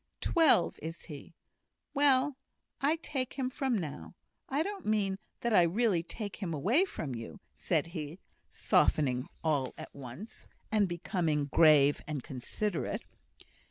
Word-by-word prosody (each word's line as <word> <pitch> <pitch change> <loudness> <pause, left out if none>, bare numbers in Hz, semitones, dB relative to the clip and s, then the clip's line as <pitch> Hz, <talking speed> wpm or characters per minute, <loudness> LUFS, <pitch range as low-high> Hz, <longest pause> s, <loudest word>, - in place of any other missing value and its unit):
"Twelve, 320 - +4
is 165 +2 -6
he! 155 +2 -10 0.6
Well, 280 -1 +4 0.5
I 290 +4 +3
take 265 -4 -3
him 260 -1 -2
from 265 -4 0
now. 140 - -6 0.3
I 280 +4 +1
don't 400 - -6
mean 200 -3 +1 0.2
that 235 -1 0
I 190 - +7
really 185 +1 +2
take 205 +4 -6
him 175 -6 -3
away 230 - +3
from 150 - -5
you," 115 -1 -7
said - - 0
he, 165 -2 -6 0.3
softening 130 -2 +2 0.2
all 145 -5 0
at - - -9
once, 140 - -9 0.2
and 210 -3 +3
becoming 170 -4 0
grave 150 -3 +6
and 150 -5 -3
considerate. 160 - -3
180 Hz, 135 wpm, -31 LUFS, 150-245 Hz, 0.6 s, I